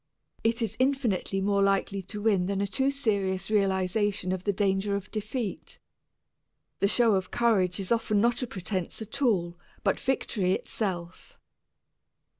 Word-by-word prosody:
It 230 +1 +1
is 225 -1 -2
infinitely 250 -8 +1
more 200 0 +2
likely 195 0 +1
to 205 +3 -7
win 195 -5 +3
than 195 0 -1
a 200 - +1
too 265 +7 +1
serious 200 -8 -1
realization 195 -1 +1
of 185 -1 -3
the 205 - +3
danger 200 0 +1
of 200 0 -5
defeat. 215 0 -4 1.0
The 200 - +3
show 230 +1 +3
of 190 -2 0
courage 200 -7 +2
is 195 +1 -4
often 225 -3 +2
not 235 +4 +2
a 250 - -2
pretense 185 -3 -4
at 250 +6 -8
all, 175 -9 +1 0.2
but - - +1
victory 200 -8 0
itself. 180 -5 -4
200 Hz, 150 wpm, -28 LUFS, 190-225 Hz, 1.0 s, win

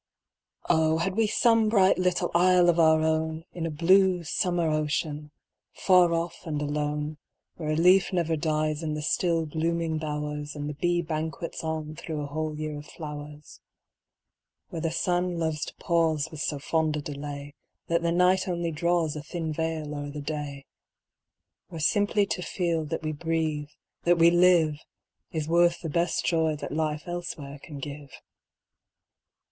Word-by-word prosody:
Oh! 160 0 +3
had 185 +3 -1
we 225 0 +3
some 225 0 +3
bright 195 -4 +4
little 180 -1 +1
isle 180 0 +5
of 170 0 +3
our 160 -1 +5
own, 160 0 0
In 165 -2 -3
a - - -3
blue 180 +3 +4
summer 175 +1 0
ocean, 150 -1 -1 0.4
far 180 -2 +4
off 170 +1 -3
and 150 -2 -2
alone, 150 +1 -2 0.4
Where 155 -3 -4
a 155 - +1
leaf 180 +4 +5
never 170 -3 +1
dies 155 -1 -1
in 155 -2 -2
the 150 - -4
still 165 +1 +1
blooming 160 +1 -1
bowers, 150 -1 -4
And 145 0 -4
the 150 - -3
bee 175 +3 0
banquets 160 0 -4
on 155 -1 -3
thro' 160 -1 -5
a - - -3
whole 155 +1 -3
year 155 -1 -4
of 145 - -12
flowers; 150 -1 -9 1.1
Where 165 - -5
the 165 - 0
sun 175 +1 0
loves 160 -2 -1
to - - -10
pause 165 -4 +1
With 155 -2 -6
so 145 - -1
fond 155 +1 0
a - - -3
delay, 145 0 -6 0.3
That 170 0 +1
the 170 0 +1
night 180 +2 +3
only 170 -2 -1
draws 165 0 0
A 150 - -4
thin 160 +1 -4
veil 160 -1 -3
o'er 145 0 -5
the 145 +1 -6
day; 145 -2 -5 1.0
Where 165 - -8
simply 205 +5 +2
to 195 - -3
feel 170 -2 -1
that 150 - -4
we 155 - -1
breathe, 155 -1 -2 0.4
that 175 0 +4
we 170 0 +6
live, 175 -4 +4 0.5
Is 155 -2 -3
worth 170 +1 +3
the 165 - -4
best 170 +3 0
joy 160 -2 +2
that 150 - -6
life 150 0 -1
elsewhere 170 -5 -6
can 150 - -9
give. 140 0 -7
160 Hz, 165 wpm, -27 LUFS, 150-175 Hz, 1.1 s, we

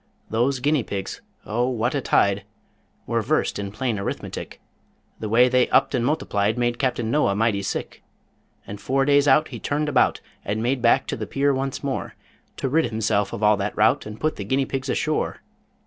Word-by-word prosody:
Those 125 +4 +1
guinea 145 +1 +2
pigs 100 -3 -5 0.2
O 120 +4 0
what 120 0 -1
a 140 - 0
tide! 100 -4 +2 0.6
Were - - 0
versed - - 0
in 100 -1 -4
plain 115 -1 -2
Arithmetic; 100 - -5 0.6
The 110 - -4
way 120 +3 +5
they 125 0 +2
upped 130 +2 +3
and 125 -3 +1
multiplied 110 -6 0
Made 120 0 0
Captain 120 -4 0
Noah 130 -9 +2
mighty 105 -1 +1
sick. 95 - -4 0.6
And 100 0 -8
four 135 +4 +1
days 145 0 +4
out 150 +3 +4
he - - -7
turned 150 +1 -1
about, 145 - +3 0.2
And 105 +3 -2
made 125 +1 0
back 115 - +4
to - - -3
the 110 -2 -5
pier 140 +5 +1
once 135 +1 -3
more 140 -1 -3 0.4
To - - -2
rid 160 +5 +2
himself 110 -3 0
of 105 - -5
all 105 0 +5
that 100 +1 -3
rout, 105 0 +3
And 105 0 -8
put 155 0 -1
the 100 - -4
guinea 130 +7 0
pigs 135 0 -4
ashore. 155 +3 -1
120 Hz, 195 wpm, -23 LUFS, 105-135 Hz, 0.6 s, way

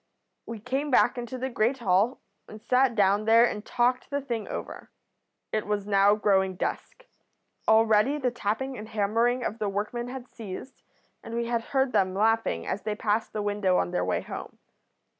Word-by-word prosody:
"We 230 - -5
came 265 +6 -2
back 250 -1 +3
into 240 +2 -5
the 260 +1 -3
great 235 +3 +1
hall, 210 +1 +1 0.3
and 215 - -10
sat 250 +2 +2
down 205 0 +3
there 230 +2 +6
and 210 -3 -3
talked 250 +2 0
the 285 - -1
thing 235 -6 -4
over. - - -7 0.6
It 215 -1 -2
was 205 -1 -1
now 200 0 +4
growing 190 -3 +2
dusk. - - -4 0.6
Already 220 +5 +4
the 255 -4 0
tapping 240 +3 -3
and 215 +1 -9
hammering 230 +4 +1
of 225 0 -3
the 210 -2 -1
workmen 210 +5 -3
had 255 0 -7
ceased, 225 +4 -9 0.4
and 230 - -7
we 235 0 -1
had 235 -1 -1
heard 265 -1 +1
them 185 -4 +1
laughing 220 - +1
as 205 - -3
they 210 +1 -3
passed 215 +1 -1
the 210 - -3
window 205 -3 +1
on 90 - 0
their 90 - 0
way 90 0 0
home. - - -8
225 Hz, 180 wpm, -27 LUFS, 205-245 Hz, 0.6 s, there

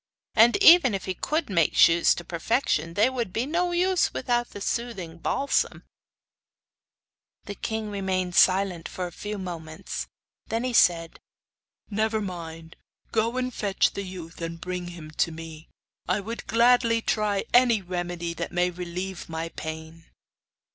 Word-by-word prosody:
And 230 - +6
even 320 - +8
if 195 - -5
he 185 - -2
could 305 - -2
make 170 -6 +1
shoes 165 0 +5
to 175 - -6
perfection 170 - -1
they 210 +4 +4
would 245 -6 -3
be 230 +6 -1
no 350 +4 0
use 360 +1 +2
without 240 -1 -1
the - - -9
soothing 200 -7 -4
balsam.' 280 +10 0 1.6
The 205 - -6
king 220 +1 -4
remained 190 -2 -2
silent 185 -2 +3
for 180 - -4
a 175 - -6
few 210 +4 -6
moments, 170 -2 -6 0.4
then 225 +2 -2
he 255 -1 -2
said: 165 -6 +3 0.7
'Never 220 +1 0
mind. 165 -4 -7 0.3
Go 230 +2 0
and 255 0 -2
fetch 200 -3 +1
the 200 - -4
youth 180 -4 -9
and 165 0 -5
bring 180 0 -4
him 165 -3 -9
to 170 - +2
me. 160 0 -10 0.4
I - - +1
would 225 +4 -7
gladly 230 0 +3
try 210 -2 0
any 245 -3 +5
remedy 175 -1 -4
that 170 +1 -5
may 180 +1 +1
relieve 180 +1 -6
my 165 0 -4
pain. 160 +1 -8
190 Hz, 150 wpm, -26 LUFS, 170-230 Hz, 1.6 s, even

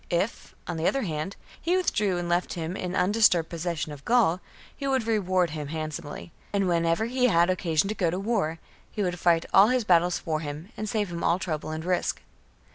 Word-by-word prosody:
If, 185 +6 -2
on 175 - -4
the 160 - 0
other 275 - +1
hand, 160 +1 -3 0.3
he 350 +3 +2
withdrew 210 - +1
and 175 0 -3
left 175 +1 0
him 170 +1 -4
in 180 -1 -4
undisturbed 180 -3 +3
possession 170 -2 -3
of 145 -1 -10
Gaul, 220 -8 +3 0.3
he 275 - -4
would 265 -4 +1
reward 185 -6 +1
him 150 -2 -5
handsomely; 155 +1 -6 0.2
and 200 -2 +1
whenever 170 +3 +1
he 250 +1 +2
had 175 -4 +4
occasion 175 -1 +1
to 210 - -1
go 180 -5 0
to 175 - -2
war, 195 -7 0 0.3
he 210 - -2
would 180 -2 -2
fight 170 -1 +3
all 195 +2 +8
his 250 0 +2
battles 175 -2 +3
for 155 -2 -2
him 155 +4 -6
and 215 -1 -4
save 210 -3 -1
him 170 0 -4
all 170 - +3
trouble 155 -4 -4
and 155 +1 -5
risk. 180 -1 0
175 Hz, 205 wpm, -27 LUFS, 165-205 Hz, 0.3 s, all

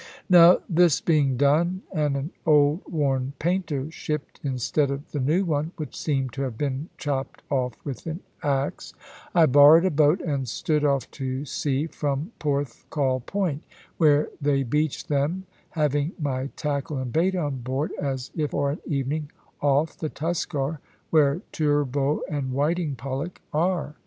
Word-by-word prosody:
Now 175 0 +8
this 170 -3 +4
being 145 -6 +2
done, 165 +7 +2
and 150 -2 +1
an 140 +5 -4
old 150 +1 +4
worn 135 -4 0
painter 160 -4 -1
shipped 150 -2 -5
instead 135 +2 0
of 140 +2 -5
the 145 - -2
new 155 +9 +2
one, 155 +1 -1
which 155 -3 -6
seemed 135 -5 -1
to 135 - -4
have 130 -5 -3
been 145 +3 -2
chopped 140 -2 -3
off 125 -3 0
with 140 +2 -6
an 165 +3 -4 0.2
axe, 140 -2 -2 0.4
I 170 -2 +7
borrowed 145 +5 +7
a 190 - +2
boat 150 +3 +4
and 140 -6 -2
stood 150 +7 0
off 140 -2 +1
to 130 0 -4
sea 140 +1 -1
from 150 +2 -3
Porthcawl 140 -2 -1
Point, 180 -8 -1 0.4
where 150 -2 +4
they 140 -1 +2
beach 150 +5 -1
them, 155 +4 -1 0.2
having 150 0 0
my 135 -3 -1
tackle 145 -1 -2
and 130 -2 -4
bait 180 +4 +2
on 145 -6 -1
board, 130 +5 -2
as 135 -3 -3
if 150 -3 0
for 140 -1 0
an 150 - -5
evening 145 +1 -2 0.3
off 145 +2 +2
the 155 - -2
Tuskar, 155 -2 -2 0.3
where 150 +1 +3
turbot 145 -2 +1
and 135 -3 -3
whiting 150 +2 0
pollack 135 +7 -5
are. 155 -2 0
145 Hz, 155 wpm, -25 LUFS, 135-160 Hz, 0.4 s, Now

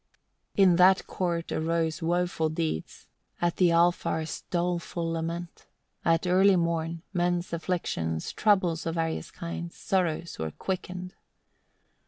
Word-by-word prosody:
1. 200 - +5
In 175 - +4
that 185 +1 +6
court 170 -2 -2
arose 165 +1 0
woeful 175 -1 +1
deeds, 155 - -3 0.3
at 175 -1 0
the 180 -2 +5
Alfar's 170 -2 +1
doleful 175 -1 -1
lament; 165 +1 -4 0.4
at 165 +1 +2
early 190 +2 +5
morn, 170 -1 -1
men's 175 -1 0
afflictions, 125 - -2
troubles 185 -6 +2
of 165 - -2
various 165 -1 -2
kinds; 170 0 -6
sorrows 170 -4 -1
were 80 - -2
quickened. 180 - -5
170 Hz, 120 wpm, -28 LUFS, 165-180 Hz, 0.4 s, that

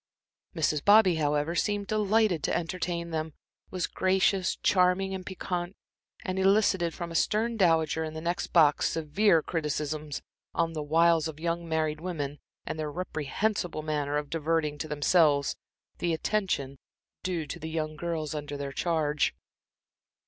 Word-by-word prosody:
Mrs. 150 -1 +1
Bobby, 205 -4 +6
however, 150 +1 0
seemed 205 +3 0
delighted 215 -4 +2
to - - 0
entertain 170 0 -3
them, 160 -1 -3 0.4
was 185 -2 -2
gracious, 190 0 +1
charming 185 +1 +2
and 190 -1 -4
piquante, 180 0 -4 0.5
and 185 0 -2
elicited 190 -3 +3
from 170 -1 -5
a - - -6
stern 220 +7 +1
dowager 160 -5 +2
in 155 0 -5
the - - -4
next 170 +2 -2
box 155 -4 +4
severe 165 +2 +2
criticisms 150 -2 -3 0.3
on 165 -1 +1
the 155 - -3
wiles 165 +1 +3
of 155 -1 -8
young 170 0 -2
married 155 -1 0
women, 150 -5 -4 0.3
and 155 - -4
their 150 -1 -3
reprehensible 175 +1 -2
manner 150 -1 -1
of 150 -1 -4
diverting 160 -2 0
to 155 - -3
themselves 150 -1 +3 0.4
the 170 -2 +1
attention 160 -8 -1 0.4
due 175 -4 -2
to - - -7
the 160 - -5
young 155 -1 -3
girls 155 -2 -3
under 145 -1 -5
their 140 -1 -4
charge. 150 -2 0
165 Hz, 150 wpm, -28 LUFS, 150-185 Hz, 0.5 s, Bobby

